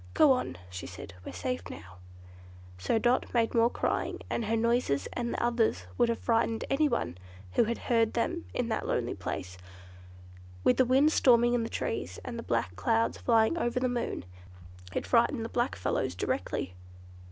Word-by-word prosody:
"Go 300 - +6
on," 250 - 0
she 90 - -6
said, 90 +2 -9
"we're - - -7
safe 90 +2 -4
now," 90 +2 -10 0.8
so 95 - +1
Dot 240 +3 +1
made 230 -1 +2
more 230 0 +4
crying, - - -1
and 235 - -1
her 225 +2 +1
noises 230 - +1
and 235 -1 -2
the - - -2
others 235 - +1
would 235 - +3
have 230 - 0
frightened 225 -1 0
anyone 275 - +1 0.3
who 225 - +3
had 235 +2 -1
heard 230 -2 +1
them 340 +8 -1
in 245 - -1
that 220 - -2
lonely 120 0 0
place, 95 -1 -5 1.0
with 250 - +4
the 260 - +5
wind 270 +5 +4
storming 240 -4 +5
in 240 - +2
the 225 - -3
trees, - - -3
and 240 -2 -5
the - - -3
black 115 - -1
clouds 110 +4 +1
flying 230 +7 +3
over 240 -2 0
the 255 - +1
moon. 240 - -3 0.7
It - - -2
frightened - - +2
the - - -5
black - - 0
fellows - - -1
directly. 90 - -2
230 Hz, 175 wpm, -30 LUFS, -, 1.0 s, Go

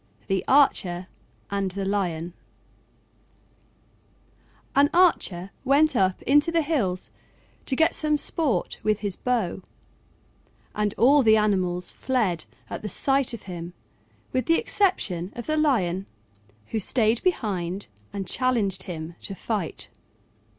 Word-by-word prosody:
THE 195 -1 0
ARCHER 190 -10 +3 0.5
AND 200 -1 0
THE 195 +1 -4
LION 175 -4 -2 2.4
An 285 +1 +5
Archer 200 - +3
went 280 +2 +3
up 190 -4 +1
into 295 +4 +4
the 335 -1 +2
hills 225 - -1 0.6
to 265 - +1
get 320 +4 +3
some 305 -1 +1
sport 290 - -1
with 215 -1 0
his 200 -3 -1
bow, 225 -8 -1 1.1
and 210 -1 -1
all 280 +5 +5
the 220 -3 +5
animals 185 -4 0
fled 215 -11 -1 0.2
at - - -6
the 210 - -4
sight 270 +5 +1
of 230 - -12
him 175 -1 -7 0.6
with 255 0 -1
the 330 0 +4
exception 195 - 0
of 240 - -6
the 310 - 0
Lion, 195 - +1 0.6
who 220 - -1
stayed 225 +2 +2
behind 200 - -1 0.3
and 195 -1 -4
challenged 215 -5 +1
him 160 -1 -6
to 195 - -6
fight. 200 -5 -3
210 Hz, 125 wpm, -25 LUFS, 185-275 Hz, 2.4 s, An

